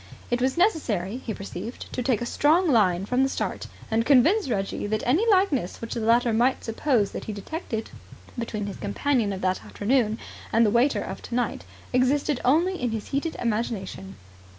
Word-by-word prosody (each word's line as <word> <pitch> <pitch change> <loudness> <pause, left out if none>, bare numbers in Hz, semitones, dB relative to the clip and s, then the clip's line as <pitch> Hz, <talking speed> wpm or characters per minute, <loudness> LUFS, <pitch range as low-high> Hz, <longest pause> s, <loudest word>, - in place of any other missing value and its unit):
It 245 0 +1
was 260 +3 +1
necessary, 245 - +1
he 250 -3 -6
perceived, 215 +4 -7
to - - -2
take 240 -2 +1
a - - -2
strong 320 +9 +3
line 195 - +3
from 250 +4 +1
the 270 - +3
start, - - -3 0.2
and 225 +1 +2
convince 285 - +4
Reggie 195 -2 -2
that 215 +1 -1
any 345 - +3
likeness 370 - +2
which 230 - -5
the 235 - -3
latter 230 +1 +3
might 245 +4 +2
suppose 225 -2 +1
that - - -6
he 215 - -4
detected 225 - -5 0.4
between 225 -3 -3
his 200 - -6
companion 225 +1 0
of 190 -1 -5
that 185 0 0
afternoon 220 0 0 0.3
and 230 +1 +4
the 210 - +2
waiter 245 +6 +2
of - - -6
tonight 245 0 -2 0.3
existed 260 +2 +2
only 335 +6 +2
in 245 - 0
his 220 -2 -5
heated 285 +4 -2
imagination. 210 -4 -3
240 Hz, 180 wpm, -25 LUFS, 215-275 Hz, 0.4 s, convince